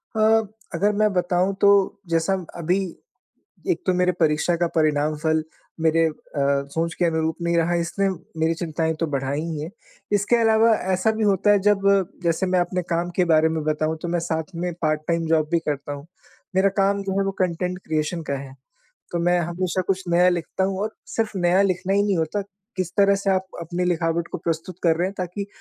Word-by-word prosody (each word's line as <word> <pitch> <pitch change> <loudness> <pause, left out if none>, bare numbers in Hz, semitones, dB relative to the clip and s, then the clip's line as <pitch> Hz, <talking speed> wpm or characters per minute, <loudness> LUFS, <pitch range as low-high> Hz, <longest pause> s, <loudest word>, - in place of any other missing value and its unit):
अ, - - -1 0.6
अगर 205 +2 +2
मैं 215 -1 +4
बताऊँ 180 +1 +1
तो 200 - +6 0.4
जैसा 165 +3 +1 0.2
अभी, 175 +2 +1 0.9
एक 355 - -2
तो 185 - +2
मेरे 180 0 +2
परीक्षा 160 +1 +2
का 175 0 +1
परिणाम 155 -1 +2
फल 160 0 +2 0.4
मेरे 165 0 +3
अ, 160 - -2 0.3
सोच 140 +4 0
के 175 - +1
अनुरूप 160 0 0
नहीं 170 0 +1
रहा 170 +1 +2
इसने 195 +4 0 0.3
मेरी 160 +1 +2
चिंताएँ 160 -1 -2
तो 165 - 0
बढ़ाई 140 +1 -2
ही 160 -3 -4
है। 155 - -5 0.4
इसके 205 +3 +3
अलावा 225 0 +4 0.2
ऐसा 185 +4 +2
भी 220 0 -2
होता 200 0 +3
है 205 - +5
जब 195 -1 +2 0.4
जैसे 170 +2 +1
मैं 185 -1 +2
अपने 180 +1 0
काम 170 +1 0
के 180 - +3
बारे 160 -1 +4
में 160 -1 -2
बताऊँ 155 +1 0
तो - - -4
मैं 175 0 0
साथ 165 +1 -3
में 175 0 -2
पार्ट 155 -1 +1
टाइम 170 -1 0
जॉब 155 -1 +2
भी 170 - +3
करता 145 -2 -3
हूँ। 140 +1 -9 0.5
मेरा 195 +1 +4
काम 200 0 +2
जो 195 0 -2
है 195 - +1
वो 195 - 0
कंटेंट 180 0 -1
क्रिएशन 155 +2 -1
का 140 - -3
है, 135 -1 -9 0.6
तो 170 - 0
मैं 175 +1 +2
हमेशा 175 +2 -1
कुछ 190 -1 0
नया 175 +1 +4
लिखता 175 +1 -1
हूँ 190 0 -1
और 220 +1 -3
सिर्फ 225 -2 -2
नया 180 +1 +3
लिखना 185 0 0
ही 200 - +3
नहीं 205 -3 +1
होता, 165 +5 -1 0.4
किस 185 -3 -2
तरह 200 -1 +5
से 195 0 -1
आप 190 0 +1
अपनी 175 +2 -2
लिखावट 170 -1 0
को - - -3
प्रस्तुत 165 +1 -3
कर 165 -2 +3
रहे 175 +2 +1
हैं, 195 - -9
ताकि 185 +3 -4
175 Hz, 205 wpm, -23 LUFS, 160-190 Hz, 0.9 s, तो